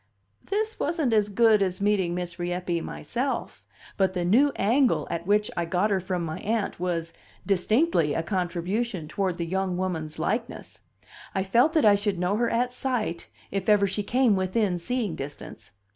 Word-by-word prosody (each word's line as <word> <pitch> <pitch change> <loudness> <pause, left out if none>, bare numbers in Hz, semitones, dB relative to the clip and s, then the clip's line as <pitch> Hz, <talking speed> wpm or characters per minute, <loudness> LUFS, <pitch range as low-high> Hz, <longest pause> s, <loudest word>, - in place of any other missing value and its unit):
This 430 +3 -2
wasn't 305 -6 0
as 210 -1 +3
good 220 0 +4
as 185 -2 0
meeting 200 -4 +1
Miss 175 -1 -5
Rieppe 175 -1 -2
myself; 245 - -4 0.3
but 190 -1 +2
the 180 -2 -1
new 260 +11 +4
angle 245 +6 +2
at 170 +1 -4
which 210 +1 +2
I 170 - -1
got 180 +5 +1
her 195 - +2
from 180 -2 -3
my 160 -1 -5
Aunt 220 -3 -2
was 170 -2 -2 0.3
distinctly 200 - +2
a 165 - 0
contribution 185 +1 -2
toward 185 0 -2
the 170 - -2
young 185 +1 -1
woman's 165 -5 -3
likeness; 225 +9 -3 0.6
I 190 - +1
felt 235 +11 +3
that 315 -8 +3
I 210 - +7
should 200 -1 0
know 180 +3 0
her 235 0 +1
at 245 +2 0
sight, 245 -10 -2 0.2
if 195 +1 -2
ever 205 -1 +5
she 200 +2 -2
came 240 +1 +2
within 190 0 0
seeing 225 -1 -2
distance. 140 +1 -8
195 Hz, 175 wpm, -26 LUFS, 175-230 Hz, 0.6 s, I